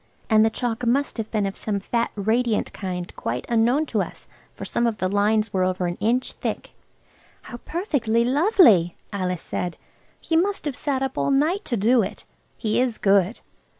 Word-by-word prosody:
And 215 0 +6
the 220 - +4
chalk 235 +1 -3
must 260 +4 +1
have 225 -1 -4
been 210 -3 0
of 195 - -3
some 205 -2 -2
fat 235 +4 -1
radiant 220 +2 0
kind 180 -3 -5
quite 120 +2 -3
unknown 240 +6 +2
to - - -1
us, - - -7 0.3
for - - -7
some 235 - 0
of 225 -2 -2
the 185 - 0
lines 210 +2 +1
were 185 -1 +2
over 185 0 0
an 175 0 -3
inch 245 +4 0
thick. - - -5 0.7
"How 240 - -8
perfectly 245 - 0
lovely!" 260 - +4 0.2
Alice 180 -3 -2
said; 175 -1 -4 0.4
"he 325 - -2
must 390 +3 +1
have 290 -3 -2
sat 270 -1 -1
up 265 -1 -3
all - - +1
night 310 +9 +2
to 240 - -1
do 230 +4 +4
it. 195 - -5 0.3
He 215 -1 0
is 250 -3 -1
good. 195 +2 +2
225 Hz, 185 wpm, -23 LUFS, 200-255 Hz, 0.7 s, And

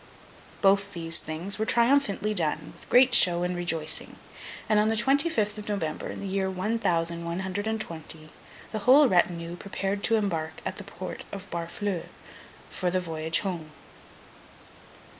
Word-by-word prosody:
Both 200 0 +3
these 165 -1 +1
things 170 +7 -4
were 220 - +1
triumphantly 235 -4 +2
done, 155 -4 0
with - - -15
great 250 0 +6
show 175 -5 +6
and 180 0 -1
rejoicing; 165 -3 -2 0.5
and 215 -1 +4
on 210 - +3
the 225 - +1
twenty 280 +7 +3
fifth 210 -8 -1
of 210 - -8
November, 160 -7 -3
in - - -6
the 200 - -4
year 190 0 -1
one 200 +5 -1
thousand 170 -4 0
one 170 +2 -3
hundred 190 +3 -3
and 220 0 -1
twenty, 160 -4 -7 0.4
the 215 - -2
whole 265 +7 +6
retinue 175 -3 +1
prepared 195 +1 -3
to 225 - +3
embark 165 -7 -1
at - - -3
the - - -6
Port - - -7
of 200 0 -7
Barfleur, 170 +2 -3 0.6
for 180 - -1
the 185 +1 +1
voyage 160 -2 -1
home. 170 -6 -5
190 Hz, 165 wpm, -27 LUFS, 170-210 Hz, 0.6 s, great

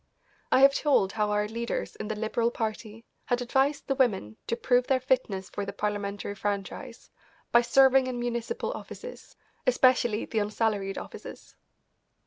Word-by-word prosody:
I 260 - +5
have 275 0 +8
told 275 -11 +2
how 210 -1 0
our 210 0 +1
leaders 235 +2 -4
in 215 - -6
the 215 - -3
Liberal 225 +2 0
Party 220 -1 -5 0.2
had 245 - 0
advised 265 +4 +1
the 275 - 0
women 205 - +1
to 230 - 0
prove 245 +1 +2
their 265 -1 +3
fitness 230 -7 0
for 205 - -3
the 200 - -4
Parliamentary 205 -1 -3
franchise 200 -1 -5 0.4
by 235 - +6
serving 265 +2 +5
in 250 -1 -3
municipal 235 -1 -2
offices, - - -10 0.3
especially 245 -3 +3
the 220 - -1
unsalaried 205 -2 -1
offices. - - -9
230 Hz, 150 wpm, -28 LUFS, 210-255 Hz, 0.4 s, have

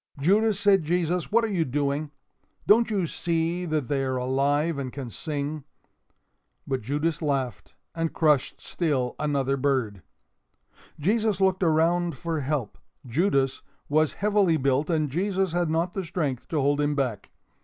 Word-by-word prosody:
"Judas," 205 +6 +3
said 200 -2 +4
Jesus, 175 +2 -1
"what 230 +2 +4
are 215 - -3
you 170 -3 +2
doing? 145 +1 -1 0.6
Don't 230 +3 +5
you 200 -5 0
see 170 +2 -1
that 155 -5 -1
they 135 0 0
are 130 -1 -1
alive 140 +4 +1
and 130 -2 -4
can 130 -3 -7
sing?" 150 +1 -4 1.0
But 130 -1 -2
Judas 150 +7 -1
laughed 135 -5 -2 0.2
and 165 -1 -2
crushed 150 -5 +1
still 140 -8 -1
another 140 -2 0
bird. 130 -8 0 1.0
Jesus 210 +4 +1
looked 190 -1 +2
around 170 +1 +2
for 165 -2 -3
help. 135 -5 -3 0.3
Judas 135 - +1 0.3
was 155 +1 +2
heavily 200 -5 +2
built 140 +2 +1
and 155 -3 +1
Jesus 190 +3 0
had 175 -1 0
not 165 +3 0
the 195 - -3
strength 155 -7 -3
to 160 - -1
hold 145 +1 +2
him 145 0 +1
back. 125 -8 -2
155 Hz, 150 wpm, -26 LUFS, 140-175 Hz, 1.0 s, Don't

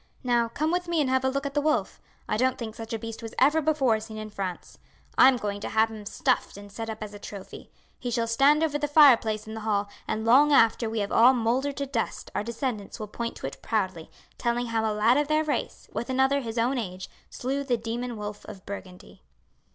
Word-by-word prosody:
Now, 240 -2 +2
come 310 +7 -1
with 355 0 -1
me 340 -1 0
and 270 -4 +1
have 260 0 +2
a 265 - +2
look 275 +1 -2
at 280 - -3
the 290 - +1
wolf. 285 -10 0 0.3
I - - 0
don't 255 +3 +1
think 225 -2 -5
such 225 0 -8
a 225 - -1
beast 225 +1 -7
was 225 -1 -8
ever 295 +5 +4
before 275 -7 +2
seen 220 0 -9
in 215 0 -7
France. 190 -3 -6 0.4
I - - +8
am 265 -1 +4
going 205 -3 -4
to - - -4
have 220 0 +2
him 210 -2 -8
stuffed - - 0
and 205 0 -11
set 225 +2 -6
up 220 0 -5
as 210 -1 -8
a 205 - -9
trophy. 200 -1 -10 0.3
He 245 - -4
shall 235 -1 0
stand 275 +7 +4
over 295 -2 0
the 295 - 0
fireplace 240 -8 +5
in 220 - -8
the 220 - -5
hall, 205 -2 -1 0.2
and 220 +1 -2
long 275 +6 +6
after 230 -3 +4
we 220 -1 -1
have 200 - -3
all 250 +3 +6
mouldered 255 +4 0
to 280 - -1
dust 260 -4 -3
our - - -1
descendants 230 -2 -4
will 215 - -5
point 230 +2 -4
to - - -7
it 135 - -6
proudly, 185 -7 -2 0.3
telling 240 0 0
how 230 -1 -1
a 220 - +1
lad 215 +4 +3
of 295 0 +1
their 310 +1 +2
race, 300 -2 -3
with 235 - -4
another 265 +2 +2
his 230 -2 -6
own 245 +3 +1
age, 185 -4 -5 0.2
slew 275 +3 -3
the 250 -3 0
demon 235 +1 -4
wolf 210 0 -6
of 195 -3 -11
Burgundy." 185 -2 -9
230 Hz, 240 wpm, -27 LUFS, 215-265 Hz, 0.4 s, I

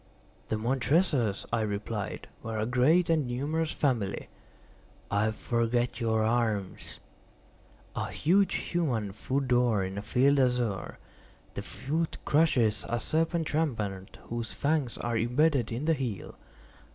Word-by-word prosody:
"The - - -1
Montresors," 125 - +1
I 115 - +2
replied, 105 0 -3
"were 115 0 -4
a 105 - 0
great 135 +9 +3
and 155 -5 +2
numerous 150 +6 -1
family." 120 -9 -1 0.8
"I 105 +2 +2
forget 120 +2 0
your 110 -1 +2
arms." 110 -4 -1 1.0
"A - - -2
huge 190 +5 +2
human 125 - -1
foot 135 +6 -2
d'or, 120 -5 +3
in 95 +1 -4
a - - -4
field 135 +7 +3
azure; 125 -7 0 0.6
the - - -4
foot 160 +4 -3
crushes 125 -9 +3
a 120 - 0
serpent 160 +4 0
rampant 105 -12 -2
whose 115 -2 -3
fangs 145 -4 0
are 120 0 -2
imbedded 125 +3 +2
in 120 +6 -3
the 165 - +4
heel." 125 -9 -4
120 Hz, 125 wpm, -29 LUFS, 110-145 Hz, 1.0 s, the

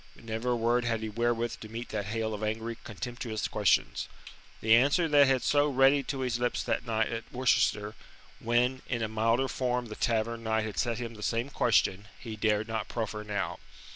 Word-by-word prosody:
But - - -17
never 115 +2 -3
a 120 - +2
word 120 +1 +2
had 115 -1 -1
he 110 - -3
wherewith 120 +1 -1
to 110 - -9
meet 115 +2 -6
that 105 -2 -3
hail 110 0 -2
of 105 - -5
angry, 110 +2 -2
contemptuous 115 0 -4
questions. - - +1 0.5
The 110 0 +4
answer 145 +8 +4
that 145 -2 +6
had - - +3
been 130 - +1
so 145 0 +3
ready 135 +1 +4
to 135 -1 -4
his 125 -2 -1
lips 125 0 0
that 115 - -2
night 110 -1 +1
at 115 0 -6
Worcester, 105 -4 +1 0.5
when, 125 +3 +1
in 120 -3 -1
a - - 0
milder 115 +4 +1
form 125 -2 -1
the 110 - -6
Tavern 115 0 0
Knight 110 -1 0
had 110 - -4
set 120 -2 0
him 120 -1 -5
the 105 - -11
same 115 +5 -1
question, 105 -5 +2
he 115 -3 -7
dared 105 0 +1
not 110 -2 -3
proffer 110 -2 -4
now. 105 -2 -3
115 Hz, 205 wpm, -29 LUFS, 110-125 Hz, 0.5 s, that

